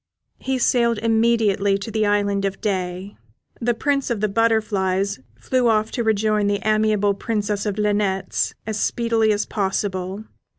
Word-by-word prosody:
He 265 0 -1
sailed 235 -2 +2
immediately 220 -3 +2
to 200 +3 -7
the 215 -1 +1
Island 200 -1 +1
of 195 0 -2
Day. 185 -1 -3 0.4
The 240 0 0
Prince 275 +2 0
of 235 -3 -1
the 215 - +1
Butterflies 200 - 0 0.2
flew 255 - +1
off 215 0 +1
to 240 - -2
rejoin 215 -1 +1
the 205 0 0
amiable 215 -1 +2
Princess 210 0 -2
of 205 0 -2
Linnets 205 -2 0
as 215 -1 -3
speedily 230 -2 +1
as 205 0 0
possible. 195 -1 -2
210 Hz, 145 wpm, -22 LUFS, 200-225 Hz, 0.4 s, sailed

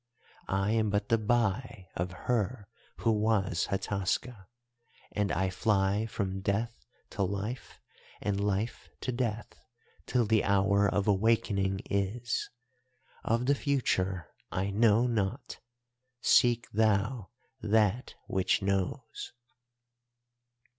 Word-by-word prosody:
I 95 +2 +1
am 110 -1 +2
but 105 +4 -1
the 115 -1 +3
Bai 110 -2 0
of 90 +1 -2
her 115 -2 0 0.3
who 115 - +3
was 105 -5 +1
Hataska, 100 +2 -2 0.6
and 105 -1 0
I 95 0 0
fly 100 +2 +1
from 95 -2 -3
Death 100 - -2 0.2
to 100 - -3
Life 100 +6 -3 0.4
and 100 -1 -1
Life 105 +3 -2
to 130 - -2
Death, 120 -3 -3 0.4
till 125 -2 +2
the 110 0 +3
hour 100 +1 +3
of 100 +1 0
awakening 100 -2 +2
is. 105 +4 -1 0.7
Of 115 +2 +1
the 140 - +4
future 95 - 0 0.2
I 95 +2 -1
know 110 +2 +4
naught; 115 +1 -2 0.6
seek 120 -1 +4
thou 110 +1 +1 0.3
that 110 +3 +1
which 95 +2 +1
knows. 100 +6 -2
105 Hz, 110 wpm, -30 LUFS, 95-115 Hz, 0.7 s, the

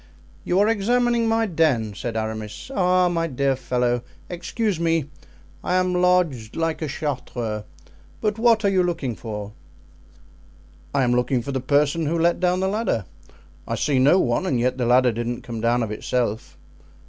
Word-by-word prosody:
"You 180 - 0
are 205 - +4
examining 235 +2 +2
my 225 0 +2
den," 155 - +1
said 115 +2 -4
Aramis. 110 - -5
"Ah, 180 -3 +3
my 165 -1 0
dear 135 -1 0
fellow, 125 -1 0 0.3
excuse 190 +2 -2
me; 165 -3 0 0.5
I 180 - 0
am 185 0 +2
lodged 180 -11 +1
like 165 0 -1
a 155 - -1
Chartreux. 125 -7 -4 0.5
But 215 0 -1
what 225 -2 +4
are - - +5
you 190 -2 +3
looking 165 -9 -2
for?" 105 -2 -6 1.4
"I 140 -2 +1
am 120 - +2
looking 125 0 +1
for 140 - -4
the 130 -1 -2
person 145 +4 +1
who 165 +3 0
let 170 +1 +2
down 180 0 +1
the 190 - +1
ladder. 200 - -1 0.6
I 115 - -1
see 140 +1 +1
no 145 +8 +5
one 185 - 0
and 130 -7 +1
yet 125 +2 0
the 120 - +1
ladder 125 0 +5
didn't 120 +2 -4
come 115 -4 -6
down 120 +1 +2
of 110 - -4
itself." 110 0 -2
145 Hz, 170 wpm, -23 LUFS, 120-180 Hz, 1.4 s, are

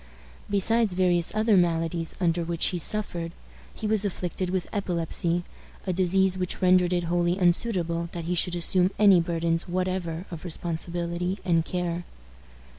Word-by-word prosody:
Besides 210 +1 +2
various 180 -2 +2
other 215 0 +3
maladies 165 -2 0
under 170 -2 +1
which 170 0 -1
he 180 - -3
suffered, 170 -4 -1 0.4
he - - -8
was 215 -1 +3
afflicted 185 -2 -3
with 185 -1 -2
epilepsy, 175 -3 -1 0.4
a 185 - -1
disease 190 +1 +2
which 180 -1 -3
rendered 180 -1 +4
it 175 -1 0
wholly 175 +1 0
unsuitable 175 -3 +1
that 170 -2 -5
he 175 - -1
should 175 0 0
assume 180 +1 +3
any 200 -4 +6
burdens 165 0 -1
whatever 180 -1 -2
of 165 -2 -7
responsibility 175 +1 -3
and 165 -3 +2
care. 175 0 -3
175 Hz, 145 wpm, -26 LUFS, 170-185 Hz, 0.4 s, any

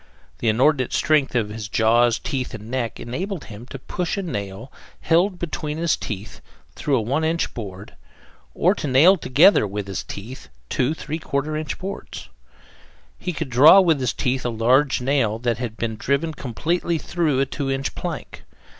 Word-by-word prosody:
The 115 - +1
inordinate 130 +3 +2
strength 150 -5 +2
of 110 -4 +1
his 105 0 -6
jaws, 115 +3 +3
teeth, 130 -4 -4
and 110 +1 -10
neck, 125 -3 -2
enabled 175 - -4
him 110 +3 -11
to 135 - -7
push 175 +8 -3
a 200 - -2
nail, 105 - -5 0.3
held 175 +3 +2
between 155 -3 -4
his 165 0 +1
teeth, 105 -4 -7 0.3
through 140 -3 0
a - - +1
one 135 +8 -1
inch 165 +1 0
board; 100 -3 -8 0.6
or 180 +4 +3
to 155 - -4
nail 145 +9 +6
together, 150 - +4
with 100 +1 -4
his 95 -1 -4
teeth, 110 +3 -9 0.2
two 130 +5 0
3/4 150 -1 -3
inch 155 - -4
boards. 195 +1 -7 0.9
He 180 - -3
could 160 -5 -5
draw 150 +10 +8
with 165 -6 +3
his 130 -2 0
teeth 130 -1 -1
a 120 - -1
large 125 +5 +2
nail 125 -5 +1
that 120 0 -1
had 115 -3 -5
been 110 -2 -3
driven 140 +7 0
completely 165 +6 -1
through 155 -4 0
a 135 - +3
two 135 +1 -4
inch 135 0 -2
plank. - - -6
135 Hz, 170 wpm, -22 LUFS, 115-160 Hz, 0.9 s, draw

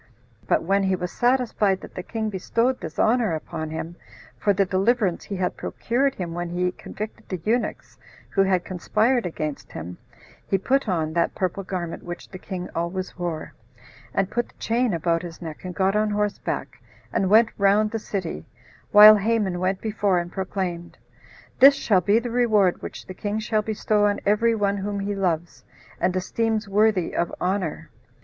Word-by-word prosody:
But - - +2
when 195 +4 +2
he 190 0 +2
was 180 -1 -4
satisfied 240 -6 +1
that - - -11
the - - -5
king 220 +2 -3
bestowed 230 +6 0
this - - -7
honor 225 -6 +2
upon 155 0 -5
him, 165 +2 -6 0.4
for 205 - +1
the 195 0 +2
deliverance 195 0 +1
he 200 - -5
had 185 -1 -1
procured 265 +3 -1
him 175 -3 -4
when 175 0 -3
he 180 +1 0
convicted 215 +3 -8
the 185 - -3
eunuchs 235 +2 -1 0.3
who 195 - +2
had 190 -2 +2
conspired 220 +5 +1
against 155 -3 -5
him, 90 +2 -7 0.5
he 195 - +2
put 260 +5 +1
on 160 -4 0
that 170 0 +1
purple 185 +1 -1
garment 180 -3 -4
which 175 0 -8
the 185 - -9
king 180 -2 -5
always 175 +2 -3
wore, 170 -3 -4 0.6
and 195 -1 0
put 240 0 -1
the - - -25
chain 235 +1 +1
about 165 -1 0
his 170 -2 -8
neck, 160 -3 -8
and 180 -1 -6
got 195 +1 +2
on 215 0 +2
horseback, 210 0 -2 0.3
and 190 - +1
went 220 +2 +6
round 205 +2 +3
the 225 - -2
city, 185 - -5 0.4
while 210 +1 +10
Haman 205 -4 0
went 185 +1 0
before 205 -4 +1
and 175 0 -2
proclaimed, 185 -3 -4 0.6
"This 275 +2 +9
shall 205 -8 +2
be 200 +5 +3
the 235 +1 -2
reward 215 -6 +3
which - - -8
the 185 - -8
king 205 +3 -3
will 215 -1 +3
bestow 210 -1 +1
on 205 0 0
every 225 +3 +3
one 200 -2 0
whom 200 +1 -3
he 205 +1 -2
loves, 175 -4 -2 0.4
and 185 - +1
esteems 220 +3 -1
worthy 205 -3 +2
of 170 - 0
honor." 185 -3 -2
195 Hz, 180 wpm, -24 LUFS, 180-215 Hz, 0.6 s, while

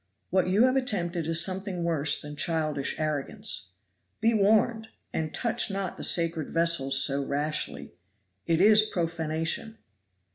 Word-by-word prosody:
What 185 -1 +2
you 195 +5 +3
have 255 +1 +3
attempted 175 - -1
is 165 +1 +2
something 190 -2 -4
worse 155 -3 +2
than 150 0 -8
childish 155 -4 -1
arrogance. 155 - -2 0.5
Be 225 +1 +2
warned! 220 +2 +2 0.3
and 155 -1 -2
touch 235 +3 0
not 195 -2 -3
the - - -7
sacred 165 -3 +1
vessels 165 -5 +2
so 140 0 0
rashly 145 +3 -3 0.5
it 165 -1 +2
is 210 +3 +7
profanation." 165 +2 -2
170 Hz, 135 wpm, -27 LUFS, 155-205 Hz, 0.5 s, is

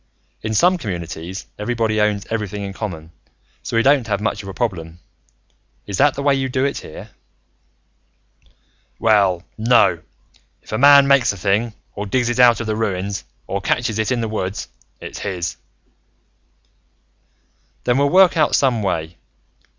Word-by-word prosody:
"In 110 0 -3
some 180 - +3
communities, 90 - -6
everybody 110 -1 0
owns 105 -1 0
everything 105 -2 -3
in 100 -1 -5
common 100 -6 -5
and 80 +1 -18 0.5
so - - -3
we 115 - +3
don't 135 -3 +3
have 100 -2 -1
much 105 -1 -2
of 95 - -9
a - - -7
problem. 85 -8 -3 0.9
Is 100 -2 -4
that 145 0 +4
the 140 - -4
way 140 -1 +3
you 135 -1 -1
do 130 +1 0
it, 140 - -2
here?" - - -11 1.9
"Well, 100 -5 +2 0.2
no. 120 +2 +3 0.6
If - - -14
a 110 - -1
man 140 0 +7
makes 140 -3 +4
a - - -10
thing, 105 +4 0 0.2
or 105 0 -5
digs 120 +3 0
it 120 +1 -2
out 120 -3 +6
of 115 - -4
the 110 0 -1
ruins, 100 -2 -3 0.2
or - - -3
catches 115 -3 -1
it 110 +3 0
in 125 -2 0
the 115 - -1
woods, 100 -3 -4 0.3
it's - - -8
his." 90 -2 -4 2.3
"Then 125 +2 +1
we'll 140 0 +3
work 185 +1 +5
out 160 - +3
some 125 -5 +2
way. 85 -4 -3
110 Hz, 165 wpm, -20 LUFS, 100-125 Hz, 2.3 s, man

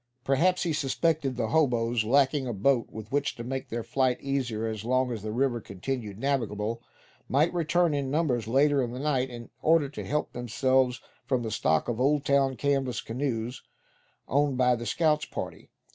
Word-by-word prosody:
Perhaps 165 +7 +2
he 165 - 0
suspected 145 -1 0
that - - -1
the 110 - -1
hoboes, 120 -5 +2
lacking 135 +3 +2
a 120 - -2
boat 120 +4 +2
with 110 -1 -9
which 145 +1 0
to 120 - -7
make 130 +2 -4
their 115 0 -3
flight 130 -1 +1
easier 125 -5 -2
as 110 -2 -4
long 130 +2 +1
as 115 -3 -4
the 110 +1 -4
river 120 0 0
continued 105 +1 -5
navigable, 115 -4 -1 0.5
might 150 +6 +2
return 170 -1 +2
in 140 -2 -1
numbers 135 -7 0
later 140 +3 +3
in 120 -1 -3
the 125 - -5
night, 135 -3 0
in 120 -1 -9
order 160 -2 +4
to 140 - -7
help 150 +1 -2
themselves 130 +1 +1 0.3
from 125 -3 +1
the 110 - -3
stock 80 -4 +1
of 120 -1 -2
Oldtown 140 -1 +2
canvas 135 -3 0
canoes 120 -1 -3 0.7
owned 140 -1 +1
by 125 -1 +4
the 120 0 -6
scouts' 155 -2 +2
party. - - -7
130 Hz, 180 wpm, -28 LUFS, 120-140 Hz, 0.7 s, order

